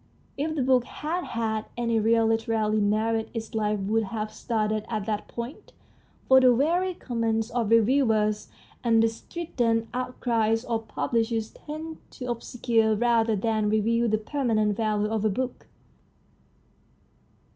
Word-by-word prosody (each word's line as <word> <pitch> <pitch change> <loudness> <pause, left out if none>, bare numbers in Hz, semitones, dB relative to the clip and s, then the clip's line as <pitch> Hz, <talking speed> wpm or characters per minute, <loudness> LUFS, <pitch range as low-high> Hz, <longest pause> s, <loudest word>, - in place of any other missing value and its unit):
If 310 +3 -2
the 280 - 0
book 255 -1 +4
had 325 +7 -4
had 220 -2 -2
any 230 -1 +1
real 225 +1 +3
literary 225 -1 +1
merit 220 +2 +1
its 225 -1 -5
life 210 -1 0
would 215 +3 +1
have 215 +1 -4
started 215 -2 -1
at 215 -3 -2
that 210 -1 -2
point, 235 +4 -7 0.5
for 260 0 +7
the 250 -2 +6
weary 350 +7 +1
comments 225 -3 -1
of 235 -3 0
reviewers 225 -2 +3 0.3
and 225 -2 +4
the - - +5
strident 230 -3 -2
outcries 230 -3 0
of 225 -2 -2
pub 145 -5 -3
lishers 225 -1 0
tend 315 +1 -7 0.2
to 250 - -7
obscure 230 -2 +1
rather 230 0 +2
than 215 +1 0
reveal 230 +2 +2
the 215 - +2
permanent 215 -3 0
value 210 -1 0
of 220 -1 -1
a 215 - +3
book. 250 +5 -4
225 Hz, 145 wpm, -26 LUFS, 215-240 Hz, 0.5 s, for